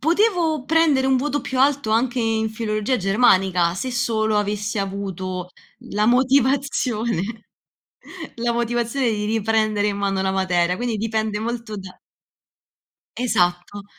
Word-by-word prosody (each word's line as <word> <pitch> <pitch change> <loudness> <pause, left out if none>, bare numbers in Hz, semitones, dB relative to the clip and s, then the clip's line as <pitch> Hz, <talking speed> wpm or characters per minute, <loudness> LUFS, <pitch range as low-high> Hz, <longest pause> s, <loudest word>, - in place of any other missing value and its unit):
potevo 330 - +1
prendere 305 -4 +3
un 265 -1 +3
voto 290 +2 -1
più 260 -1 -3
alto 275 -5 +2
anche 245 +2 +1
in 220 -1 0
filologia 215 +2 -1
germanica, 190 -4 +3
se 255 +6 -4
solo 220 -3 0
avessi 205 0 -1
avuto 190 -2 -4 0.4
la 210 +1 +1
motivazione 255 - +1 1.1
la 235 0 -1
motivazione 240 +2 -1
di 210 -1 -2
riprendere 215 -1 +1
in 200 -1 -1
mano 195 -1 -1
la 190 0 0
materia, 180 -2 +1
quindi 240 -1 -2
dipende 220 -1 -1
molto 230 -1 -4
da 190 -2 -9 1.2
Esatto. 200 -4 0
220 Hz, 125 wpm, -22 LUFS, 200-250 Hz, 1.2 s, prendere